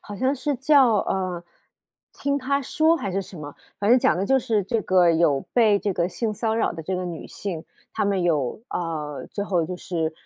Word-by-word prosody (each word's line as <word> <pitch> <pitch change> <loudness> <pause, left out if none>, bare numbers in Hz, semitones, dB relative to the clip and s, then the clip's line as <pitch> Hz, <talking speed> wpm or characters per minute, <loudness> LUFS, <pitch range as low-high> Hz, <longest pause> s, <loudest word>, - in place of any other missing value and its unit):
好 205 - -8
像 260 +5 +1
是 275 +1 -2
叫， 270 -4 +5
呃， 185 -3 -2 0.8
《听 280 0 +1
她 280 +1 0
说》 315 +4 +2
还 195 - -3
是 195 - -1
什 185 -2 -12
么。 145 -1 -8 0.2
反 205 - 0
正 245 - +7
讲 170 - +3
的 195 +2 -1
就 270 - +4
是 220 -6 0
这 225 +1 -1
个 180 -3 +4
有 155 -4 +2
被 215 -4 +4
这 200 -1 -1
个 175 0 0
性 215 +2 -3
骚 220 +1 -1
扰 - - +1
的 165 - -7
这 185 +3 -2
个 180 - -3
女 170 -3 -6
性， 180 -5 -5 0.3
她 - - -1
们 200 -2 +1
有， 155 - 0
啊， 155 -4 -4
最 200 - -3
后 180 -5 +1
就 180 +2 -5
是 165 -3 -2
195 Hz, 235 characters per minute, -24 LUFS, 170-235 Hz, 0.8 s, 正